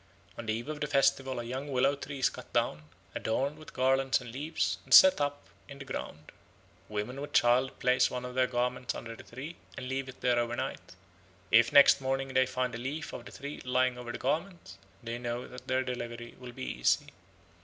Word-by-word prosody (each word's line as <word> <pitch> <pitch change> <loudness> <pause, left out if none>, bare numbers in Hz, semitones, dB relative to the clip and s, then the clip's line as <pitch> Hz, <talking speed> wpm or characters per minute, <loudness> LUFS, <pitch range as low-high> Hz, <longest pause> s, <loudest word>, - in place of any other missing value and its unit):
On 115 - -8
the 110 - +1
eve 115 +3 -4
of 150 -1 -5
the 150 - 0
festival 135 -2 +2
a - - -3
young 130 +4 -5
willow 135 +2 +3
tree 140 0 -7
is 130 - +2
cut - - -11
down, 75 0 0 0.3
adorned 140 +7 -1
with 155 - -12
garlands 135 0 +2
and 120 -2 -9
leaves, 115 - -1
and - - -20
set 190 -5 +9
up 145 0 -1 0.2
in 140 - -10
the 135 - -9
ground. 135 - -6 0.6
Women 110 +6 -4
with 145 - -7
child 125 +2 +3
place 125 0 +3
one 125 0 -4
of 125 - -6
their 130 0 +3
garments 125 0 -1
under 115 -1 -7
the - - -11
tree, 140 +8 -9 0.2
and 130 - -5
leave 130 0 -3
it 130 - -12
there 120 -1 +3
over 120 0 -1
night; - - -5 0.6
if 115 0 +6
next 140 -1 +7
morning 135 0 -1
they 130 0 +4
find 130 -1 -2
a 120 - -5
leaf 140 +6 -4
of - - -7
the - - -10
tree 140 +2 -7
lying 125 0 +2
on 120 -1 -6
the - - -5
garment, 170 +7 -3 0.3
they 115 +1 -4
know 120 0 -4
that 125 0 -11
their 130 0 +1
delivery 120 -2 -5
will 125 -1 -9
be 90 - -7
easy. - - +2
130 Hz, 215 wpm, -30 LUFS, 120-135 Hz, 0.6 s, set